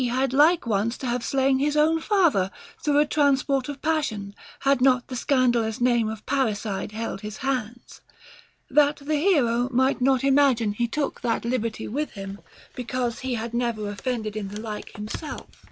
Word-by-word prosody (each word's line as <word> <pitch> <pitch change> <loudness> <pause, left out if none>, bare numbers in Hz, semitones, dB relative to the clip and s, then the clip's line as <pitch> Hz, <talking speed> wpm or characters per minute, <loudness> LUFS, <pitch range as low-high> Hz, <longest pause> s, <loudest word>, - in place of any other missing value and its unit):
151 250 +1 0
had 265 -2 -1
like 315 +5 +5
once 220 +1 0
to - - -7
have 240 0 -1
slain 270 -1 +2
his 295 +2 +1
own 320 +2 +3
father 330 - +2 0.3
through 290 -1 +2
a 295 - +5
trans 285 -3 +2
port 275 -1 -1
of 285 -1 -6
passion 245 -11 -1 0.3
had 275 -2 +2
not 255 -2 +3
the 255 - -5
scandalous 240 -4 +1
name 240 -3 +2
of 220 -1 -7
parricide 215 -7 -1
held 220 -2 -4
his 210 0 -7
hands; 245 -3 -4 0.3
* - - -21 0.3
that 295 0 +4
the 290 +2 -4
hero 255 -8 +2
might 260 +1 +2
not 265 0 +3
imagine 265 -6 +3
he 235 +3 -1
took 285 +4 -3
that 235 -1 -1
liberty 230 -2 -2
with 295 +7 -3
him 195 -1 -7 0.3
because 250 -1 -3
he 260 -2 -2
had 230 +1 -5
never 235 -4 -1
offended 215 0 -3
in 210 -2 -3
the 205 +2 -7
like 215 -1 -6
kind 210 +2 -7
himself. 310 - -6
250 Hz, 185 wpm, -25 LUFS, 220-275 Hz, 0.3 s, like